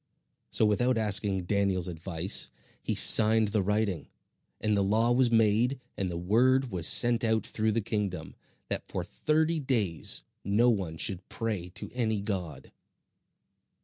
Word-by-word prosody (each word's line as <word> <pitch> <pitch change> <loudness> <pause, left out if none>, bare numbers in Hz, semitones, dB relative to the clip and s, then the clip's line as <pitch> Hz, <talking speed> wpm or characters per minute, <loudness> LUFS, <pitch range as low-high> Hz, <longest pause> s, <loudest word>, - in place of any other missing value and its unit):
So - - +4
without 120 +4 +1
asking 100 -3 +1
Daniel's 95 -1 -1
advice, 85 +1 -2 0.3
he - - -3
signed 110 -1 +7
the 105 0 0
writing; 105 -2 -2 0.5
and 105 -1 0
the 100 - +1
law 110 +4 +1
was 125 0 +3
made, 115 +3 +1 0.2
and 95 -2 -3
the 85 - -5
word 125 +8 +1
was 85 -3 -1
sent 120 0 +3
out 110 -1 0
through 110 0 -2
the 115 - -1
kingdom, 100 -7 -4 0.3
that - - -4
for - - -5
thirty 160 +1 -1
days 115 - -1 0.2
no 110 +5 +2
one 90 -7 -4
should 95 +1 -2
pray 105 -6 -4
to - - -8
any 110 -4 -1
god. 95 -6 -6
105 Hz, 145 wpm, -28 LUFS, 95-115 Hz, 0.5 s, signed